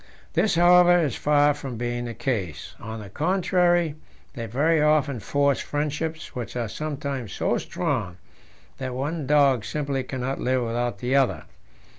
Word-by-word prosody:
This, 210 - +2
however, 175 +1 +6
is 150 -8 0
far 145 0 +3
from 135 -5 -7
being 120 +1 -2
the 120 -1 -6
case. 100 - -3
On 110 +1 -7
the 105 -2 -9
contrary, 175 - +2 0.4
they 115 -1 -5
very 150 +8 +2
often 150 -4 +2
form 140 +5 +2
friendships, 150 +3 -3
which 125 -1 -6
are 120 -2 -1
sometimes 140 -4 -4
so - - 0
strong 90 -1 -2 0.6
that 130 -2 -4
one 145 +2 -3
dog 140 -5 +4
simply 140 +1 -2
cannot 130 +1 -4
live 130 0 +1
without 120 +1 -2
the 125 +2 -1
other. 120 - +2
140 Hz, 150 wpm, -25 LUFS, 120-155 Hz, 0.6 s, however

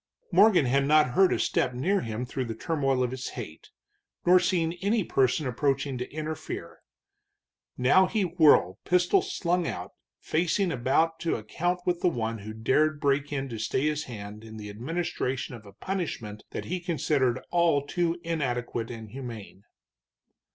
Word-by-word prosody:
Morgan 205 -9 +6
had 135 +2 +2
not 150 -3 +5
heard 190 +8 +4
a - - +2
step 125 -1 0
near 190 +10 +1
him 115 +2 -4
through 130 +1 -3
the 115 -1 -5
turmoil 135 -2 0
of 125 - -1
his 130 0 -5
hate, 90 -10 -8 0.6
nor 180 +1 +7
seen 170 -2 +1
any 205 +2 +2
person 135 -1 +1
approaching 135 +1 0
to 125 - -4
interfere. 155 0 -6 1.0
Now 160 +10 +5
he 215 0 0
whirled, 155 - +4
pistol 180 - +3
slung 180 - -1
out, - - -5 0.3
facing 175 +3 0
about 160 +6 +1
to 165 - 0
account 175 +12 -2
with 180 -1 0
the 180 - +4
one 115 -6 -3
who 105 +2 -7
dared 145 +7 +1
break 140 0 +1
in 135 -1 -2
to 115 -2 -6
stay 130 +5 0
his 150 0 0
hand 105 -2 -8
in 110 -1 -10
the 105 -1 -7
administration 135 +1 -3
of 110 -3 -11
a - - -11
punishment 120 - -4
that - - -5
he 180 +2 -2
considered 145 -7 0
all 170 -5 +3
too 170 +2 -1
inadequate 125 -8 -2
and 110 -3 -8
humane. 115 -6 -8
140 Hz, 165 wpm, -27 LUFS, 120-170 Hz, 1.0 s, nor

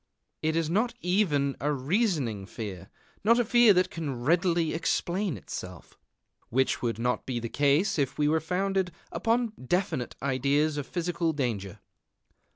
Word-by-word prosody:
It 160 0 0
is 165 -1 +1
not 225 +8 0
even 160 -8 +1
a 145 +2 0
reasoning 140 - 0
fear, 95 -3 -7 0.3
not 230 +3 +5
a 240 - +2
fear 240 -1 +6
that 180 0 +2
can 145 -7 -4
readily 170 +1 +2
explain 175 +2 -1
itself, - - -8 0.5
which 130 +3 +1
would 115 -3 -1
not 125 +2 -1
be 125 -2 -2
the 115 0 -5
case 145 - +2
if 135 0 -1
it 150 - +3
were 160 +2 +3
founded 185 +2 -1 0.2
upon 230 0 0
definite 175 -4 -1
ideas 140 +3 +1
of 145 - -4
physical 170 -2 -1
danger. 110 - -3
155 Hz, 150 wpm, -28 LUFS, 130-185 Hz, 0.5 s, fear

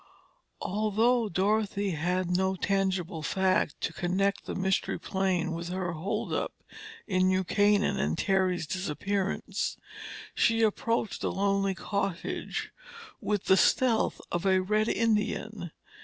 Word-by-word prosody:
Although 215 +3 +2
Dorothy 200 +1 +1
had 175 +3 -1
no 190 +1 +1
tangible 190 -4 -1
fact 185 +5 +1
to - - -2
connect 195 +2 0
the - - -4
Mystery 190 0 0
Plane 190 -3 0
with 170 +1 -4
her 180 0 -2
holdup 170 +4 -2 0.5
in 185 -2 +2
New 185 0 +2
Canaan 205 +2 +2
and - - 0
Terry's 190 -3 +1
disappearance, 190 +4 -2 0.6
she 225 0 +3
approached 225 0 0
the - - 0
lonely 195 0 +1
cottage 195 -3 -3 0.5
with 205 -2 -1
the 190 - +5
stealth 230 +3 +3
of 175 - -1
a 190 -1 +4
red 215 +3 +1
Indian. 215 -4 0
190 Hz, 120 wpm, -29 LUFS, 185-210 Hz, 0.6 s, the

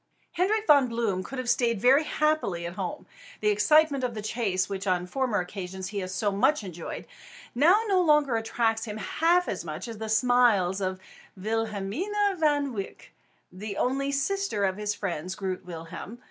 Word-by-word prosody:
Hendrik 420 +5 +1
Von 285 -6 +6
Bloom 230 -6 -1
could 270 - -7
have 255 -1 -4
stayed 235 -3 +2
very 265 +7 +5
happily 305 - 0
at 170 - -5
home. 185 -1 -5 0.3
The 210 - +2
excitement 280 +7 +4
of 245 -2 -2
the 215 - -4
chase, 200 -4 -1
which 195 0 -5
on 180 -1 +1
former 250 +2 -1
occasions 185 0 -5
he 205 -1 -3
had 185 -1 -4
so 205 +3 -1
much 215 +7 +2
enjoyed, 175 -3 -7 0.5
now 330 - +5
no 385 -4 +3
longer 300 -6 +3
attracts 225 0 0
him 210 -1 -6
half 340 +9 +2
so 185 - -4
much 155 +9 -5
as 225 -2 -7
the 220 0 -4
smiles 220 -5 +3
of 185 0 -2 0.4
Wilhelmina 225 - -1
Van 290 -4 +2
Wyk, 200 -3 -7 0.4
the 200 +2 -6
only 275 +2 0
sister 280 - 0
of 190 0 -1
his 210 0 -2
friends 180 -1 -4
Groot 190 -2 -4
Willem 165 -2 -7
and - - -7 0.2
Arend. 240 - -12
225 Hz, 180 wpm, -27 LUFS, 190-280 Hz, 0.5 s, Von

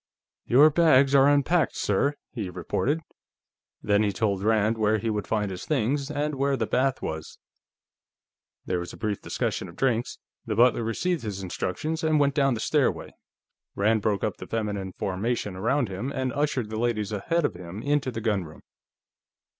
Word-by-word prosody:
"Your 145 +6 +6
bags 140 -4 +4
are 135 0 +6
unpacked, 145 +4 +2
sir," 140 +9 +1 0.2
he 110 -7 -4
reported. 145 - -1 0.8
Then 105 0 +3
he 105 -1 +2
told 100 -2 -1
Rand 110 +1 +2
where 110 0 +3
he 110 +1 -2
would 105 -1 -3
find 105 -3 -1
his 90 - -6
things, 140 0 0
and 150 0 -1
where 140 0 0
the - - 0
bath 130 0 0
was. 80 0 -5 1.3
There 90 -1 -1
was 90 - -6
a - - -10
brief 105 -3 -2
discussion - - -3
of 85 - -13
drinks. 120 -1 0 0.3
The - - -3
butler 120 0 +4
received 165 +10 -1
his 100 -3 -5
instructions 155 - -3
and 155 -1 +3
went 140 -1 +3
down 135 -3 +2
the - - -5
stairway; - - 0 0.6
Rand 110 +2 +2
broke 100 -1 0
up 105 - -1
the - - -9
feminine 105 -4 -3
formation 100 +1 -2
around 120 +7 +1
him 100 +8 -4
and 130 -2 -2
ushered 140 -6 -1
the 110 - -3
ladies 110 -3 -1
ahead 160 - 0
of - - -1
him 90 +4 -8
into 145 -2 +1
the 115 -2 -5
gunroom. 100 -8 -2
115 Hz, 175 wpm, -26 LUFS, 105-140 Hz, 1.3 s, Your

